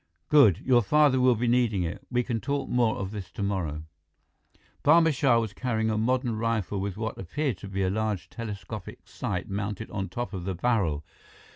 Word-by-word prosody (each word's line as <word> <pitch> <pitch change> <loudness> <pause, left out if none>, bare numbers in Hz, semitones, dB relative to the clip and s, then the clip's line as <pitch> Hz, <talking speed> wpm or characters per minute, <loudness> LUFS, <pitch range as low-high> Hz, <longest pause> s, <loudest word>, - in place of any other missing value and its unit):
"Good. 130 - +6
Your 125 -2 +5
father 145 +3 +4
will 125 -1 +5
be 120 +2 -1
needing 115 -6 +2
it. 85 0 -4
We 125 -1 +1
can 115 -2 -2
talk 140 0 -2
more 120 -3 +2
of 95 -1 -4
this 100 -4 -6
tomorrow." 90 -6 -3 1.0
Barma 160 +1 +5
Shah 130 -3 +3
was 110 -4 -3
carrying 110 -1 -1
a 110 - 0
modern 125 +1 +1
rifle 110 -3 -1
with 100 0 -4
what 110 0 -4
appeared 125 - -2
to - - -8
be 95 0 -2
a 95 - +1
large 105 -4 -2
telescopic 105 -2 -7
sight - - -4
mounted 105 +2 -4
on 95 -2 -3
top 120 -2 -4
of 95 -2 -4
the 95 0 -3
barrel. 85 -9 0
110 Hz, 185 wpm, -27 LUFS, 95-125 Hz, 1.0 s, Good